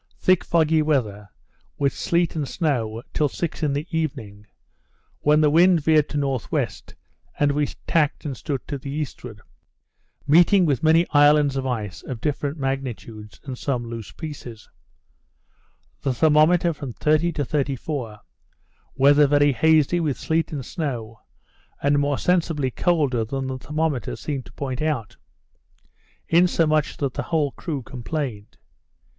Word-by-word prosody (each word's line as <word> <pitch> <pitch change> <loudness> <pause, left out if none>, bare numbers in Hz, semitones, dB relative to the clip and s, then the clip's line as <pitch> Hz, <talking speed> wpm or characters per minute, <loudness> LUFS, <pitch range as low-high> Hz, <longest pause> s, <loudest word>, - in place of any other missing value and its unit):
thick 185 -1 +3
foggy 160 -1 +2
weather, 110 -10 -1 0.5
with 140 -2 +1
sleet 170 -1 0
and 150 -3 -2
snow, 120 -9 -1
till 150 -2 +1
six 165 +4 -4
in 150 -2 +1
the 145 +2 -2
evening, 105 -10 -4 0.7
when 150 +1 +3
the 150 - +4
wind 175 +2 +5
veered 155 0 +3
to 150 - -3
N.W., 135 -4 -1 0.7
and 145 -1 +3
we 145 0 0 0.2
tacked 155 -2 +1
and 140 -3 -3
stood 140 +1 -4
to 140 -2 -4
the 135 - -8
eastward, 130 -7 -6 0.8
meeting 175 +5 +5
with 140 -6 +1
many 160 +2 +4
islands 145 -1 +5
of 135 -1 -2
ice 110 -6 -4
of 125 -4 -6
different 145 +2 -2
magnitudes, 125 -6 -5
and 130 -3 -7
some 125 -4 -2
loose 115 -2 -7
pieces: 135 -8 -9 1.3
The 135 -3 -1
thermometer 160 +4 +4
from 140 -5 -7
30 155 +6 +2
to 145 - -2
34; 135 -5 -3 0.7
weather 145 +2 +5
very 145 0 +4
hazy, 160 +4 +3
with 150 -5 -1
sleet 160 0 -1
and 140 -5 -5
snow, 115 -9 -5 0.6
and 145 +1 +2
more 145 -1 0
sensibly 165 -7 0
colder 140 -7 +1
than 135 +4 -4
the 130 0 -4
thermometer 150 -4 -2
seemed 140 -4 -5
to - - -16
point 135 -1 -4
out, 150 -9 -2 1.1
insomuch 165 -3 +2
that 140 -3 -2
the - - -3
whole 155 -4 +1
crew 145 -4 -5
complained. 125 -3 -5
145 Hz, 140 wpm, -23 LUFS, 130-155 Hz, 1.3 s, wind